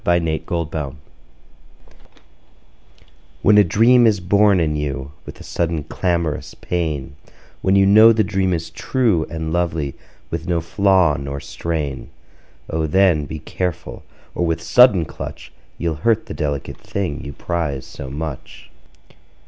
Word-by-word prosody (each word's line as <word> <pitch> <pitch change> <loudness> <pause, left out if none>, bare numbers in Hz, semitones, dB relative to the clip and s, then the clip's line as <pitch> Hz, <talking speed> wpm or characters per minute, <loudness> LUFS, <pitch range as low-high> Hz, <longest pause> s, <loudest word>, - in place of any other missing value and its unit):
Y 85 0 +3
Z 85 - -1
A 80 0 0
Pinch - - -17
of 85 -3 -1
Salt 70 -4 -4 2.5
WHEN 105 0 +6
a - - +7
dream 115 +6 +5
is 105 -3 +2
born 100 +1 +3
in 75 -2 0
you 70 -2 -4 0.2
With - - -10
a - - -10
sudden 85 -3 -2
clamorous 85 -1 -2
pain, 75 -6 -3 0.5
When 95 - +2
you 100 0 +5
know 110 +3 +8
the 110 -1 +2
dream 95 -2 0
is 80 -2 -3
true 110 -3 0
And 80 -1 -4
lovely, 85 -5 -1 0.4
with - - -4
no 85 -2 +1
flaw 90 -2 +2
nor 70 0 -5
strain, 75 -3 -4 0.6
O 80 0 -1
then, 85 -3 +3
be 80 - -6
careful, 85 +2 -4 0.3
or - - -2
with 80 -1 -1
sudden 125 -9 +5
clutch - - -8 0.3
You'll 85 -2 -1
hurt 115 +1 +2
the - - -7
delicate 75 -2 -3
thing 95 -7 -4
you 70 - -7
prize 75 -5 -3
so 65 - -9
much. 75 0 -7
85 Hz, 150 wpm, -20 LUFS, 75-95 Hz, 2.5 s, know